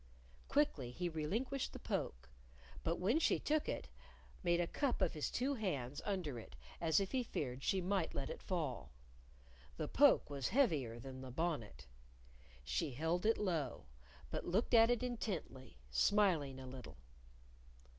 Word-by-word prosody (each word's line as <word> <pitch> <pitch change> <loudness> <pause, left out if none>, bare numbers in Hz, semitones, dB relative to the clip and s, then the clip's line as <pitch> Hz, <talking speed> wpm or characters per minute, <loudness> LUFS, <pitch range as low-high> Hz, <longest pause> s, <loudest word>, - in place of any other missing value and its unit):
Quickly 280 - +2
he 175 +8 -2
relinquished 220 - -2
the - - -5
poke, 65 +4 -3 0.6
but 165 - +1
when 215 - +2
she - - +3
took 305 0 0
it, - - -3 0.5
made 175 -2 +2
a 175 - +3
cup 270 - 0
of 185 -4 +2
his 150 - -1
two 265 +4 0
hands 145 - -2
under 175 - -2
it, 65 - -12 0.3
as 165 +1 +4
if 195 -1 -2
he 260 - +1
feared 135 - -3
she 190 +6 +1
might 185 -1 0
let 135 - -1
it - - -7
fall. 145 - -2 0.9
The - - -2
poke - - +5
was 140 -3 -2
heavier 155 - +2
than 130 +2 -8
the 130 - -7
bonnet. 130 - -2 0.8
She - - -1
held 165 - 0
it 225 - +4
low, 160 - -1 0.5
but - - -2
looked 195 +8 +1
at 230 0 +8
it 245 0 +2
intently, 185 - -4
smiling 150 - +3
a 130 - -7
little. 130 - -9
165 Hz, 155 wpm, -38 LUFS, 130-210 Hz, 0.9 s, at